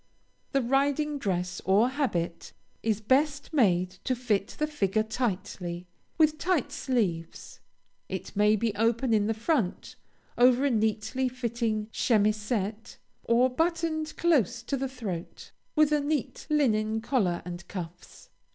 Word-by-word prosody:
The 275 -2 +1
riding 285 +3 +1
dress, 180 -4 -2
or 205 +6 +4
habit, 210 - -2 0.3
is 220 -2 0
best 285 +7 +1
made 185 - +3
to 255 - 0
fit 220 -5 -1
the 300 - +1
figure 215 -8 0
tightly, 185 -6 -3 0.3
with 310 -1 +3
tight 355 -7 0
sleeves. 190 -11 -2 0.5
It - - -6
may 210 +1 +4
be 220 0 0
open 230 +3 +1
in 210 -1 +3
the 225 - 0
front, 225 - -1 0.4
over 250 +2 +5
a 280 - +2
neatly 220 +4 0
fitting 235 -3 -2
chemisette, 215 -1 0 0.3
or 240 +2 +4
buttoned 320 +2 -1
close 245 - +2
to 275 - -2
the 270 0 -2
throat, 205 -10 -6 0.2
with 305 -1 +4
a 300 - +3
neat 285 -3 -2
linen 220 -7 +2
collar 205 -9 0
and 175 0 -7
cuffs. 175 -2 -9
235 Hz, 135 wpm, -28 LUFS, 205-275 Hz, 0.5 s, over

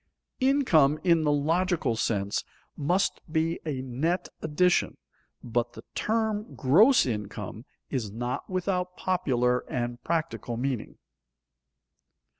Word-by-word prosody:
_Income 215 - +4
in 170 -3 +3
the 150 - +3
logical 160 -2 +1
sense 100 -2 -1 0.3
must 180 +7 0
be 160 +1 0
a 135 -4 -2
net 145 +8 -1
addition, 165 +3 +2 0.5
but 120 0 -1
the - - -10
term 220 0 -1
gross 215 - +5
income 105 -1 -5 0.3
is 120 -7 -2
not 120 +3 -4
without 180 -1 -1
popular 125 -10 +1
and 120 -1 -3
practical 160 -8 -2
meaning. 130 -2 -3
150 Hz, 105 wpm, -27 LUFS, 120-180 Hz, 0.5 s, gross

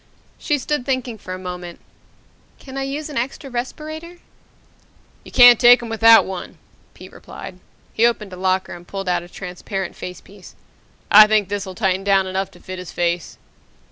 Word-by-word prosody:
She 295 - 0
stood 295 0 -2
thinking 250 -3 -3
for 185 - -7
a - - -7
moment. 180 -2 -8 0.8
"Can 265 -1 -12
I 270 - -3
use 280 +3 -4
an 295 - -7
extra 265 +3 -4
respirator?" 310 +7 -6 1.1
"You - - -14
can't 245 -2 +8
take 245 0 +7
him 235 - -7
out - - -7
without 225 0 +6
one!" 190 -2 -7 0.4
Pete - - -13
replied. - - -11 0.3
He 230 +2 +4
opened 210 -5 -3
a - - -6
locker 185 +1 -1
and 175 0 -12
pulled 195 -1 -6
out 180 -1 +1
a 175 - -13
transparent 185 +1 -6
facepiece. 180 +1 -11 0.6
"I 215 +1 +9
think 210 -3 +1
this'll 200 -2 -4
tighten 190 -2 0
down 195 -1 +3
enough 190 +1 -3
to 175 -2 -19
fit 185 +1 -8
his 180 - -8
face." 175 -1 -2
200 Hz, 175 wpm, -20 LUFS, 185-245 Hz, 1.1 s, I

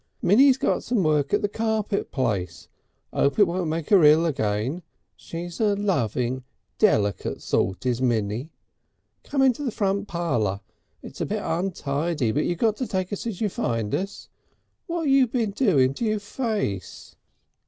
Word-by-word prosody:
Minnie's 260 +7 +5
got - - 0
some 230 -5 0
work 150 -3 +1
at 205 - +1
the - - +3
carpet 220 -1 -1
place. 100 -10 -2 0.5
'Ope 140 - +1
it 205 - +7
won't 175 -1 -2
make 160 +2 -3
'er 195 -5 +7
ill 155 +3 +6
again. 120 - -1 0.3
She's 170 +1 -7
a 210 -3 +2
loving 130 - -1 0.4
deliket 105 - +1
sort, 95 +6 -1
is 125 -1 0
Minnie.... 115 +2 0 0.7
Come 275 -2 0
into 260 +1 +3
the 265 - 0
front 200 -2 -1
parlour. 120 - -1 0.4
It's - - -9
a - - +1
bit - - -2
untidy, 160 - -1
but 145 +6 0
you 175 - 0
got 215 +4 +1
to 255 - -3
take 185 +1 -2
us 205 - -4
as 215 -4 -5
you 215 - +1
find 115 - -2
us. 195 +2 -3 0.6
Wot 335 -2 -2
you 270 -2 +4
been 225 -3 -1
doing 160 - +3
to 235 - -3
your 215 -1 0
face?" 205 - -4
175 Hz, 165 wpm, -24 LUFS, 130-210 Hz, 0.7 s, it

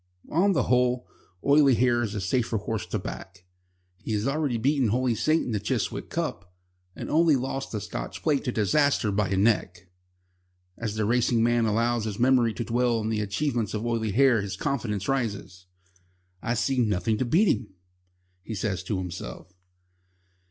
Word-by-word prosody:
On 195 +5 +3
the - - +2
whole, 125 0 +1 0.4
Oily 140 -2 +5
Hair 120 0 +2
is 110 -2 -3
a 100 - -2
safer 115 +4 0
horse 105 0 -4
to - - -2
back. 90 -1 -8 0.5
He 110 - -4
has 105 +1 -1
already 140 -3 0
beaten 135 +2 +2
Holy 125 +3 +1
Saint 155 +8 +1
in 125 - -3
the 105 - 0
Chiswick 105 - -2
Cup, 90 - -4 0.4
and - - -6
only 160 -1 +4
lost 135 +1 -3
the 110 - -2
Scotch - - -6
Plate 145 -3 +1
to 125 - 0
Disaster 120 +2 +2
by 100 -1 0
a 95 - 0
neck. 95 -4 0 0.8
As 110 -2 -4
the 110 -1 0
racing 120 0 +2
man 120 -1 +2
allows 115 +1 +1
his 105 -2 -4
memory 120 -2 +3
to 120 - -3
dwell 120 +1 +1
on 110 0 -2
the 110 -1 0
achievements 110 +1 -1
of 110 +2 -3
Oily 115 -2 -1
Hair 125 0 +4
his 100 -1 -4
confidence 105 -5 -2
rises. 100 -8 -3 0.7
"I 120 +1 -1
see 130 +3 0
nothing 110 -1 +1
to - - +2
beat 175 - +3
him," 125 - -9 0.7
he 110 +3 -6
says 95 -2 -2
to 100 0 -1
himself. 90 +1 -7
115 Hz, 175 wpm, -26 LUFS, 105-130 Hz, 0.8 s, Oily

